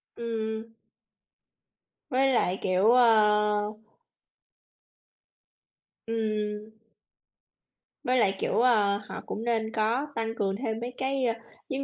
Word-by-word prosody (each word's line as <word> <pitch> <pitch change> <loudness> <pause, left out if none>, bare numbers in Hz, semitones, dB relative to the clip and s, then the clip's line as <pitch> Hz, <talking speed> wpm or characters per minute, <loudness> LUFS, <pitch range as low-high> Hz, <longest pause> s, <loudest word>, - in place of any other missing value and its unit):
Ừm, 235 - -6
ừm, 220 -1 -3
ừm. 225 0 -22 1.4
Với 265 +1 +2
lại, 190 -5 +1
kiểu, 190 +4 +3
ơ 210 -3 +4 2.3
Ừm. 215 -1 -2 1.3
Với 255 +1 +1
lại, 195 -5 +3
kiểu, - - +1
ơ, 210 -5 +3
họ - - -6
cũng 220 - -5
nên 225 -2 0
có 235 +6 0
tăng 225 0 -2
cường 195 -3 -1
thêm 220 0 -3
mấy 240 +2 -5
cái, 265 0 -1
a, 230 -1 -1 0.3
giống 275 0 -2
225 Hz, 115 wpm, -27 LUFS, 210-240 Hz, 2.3 s, ơ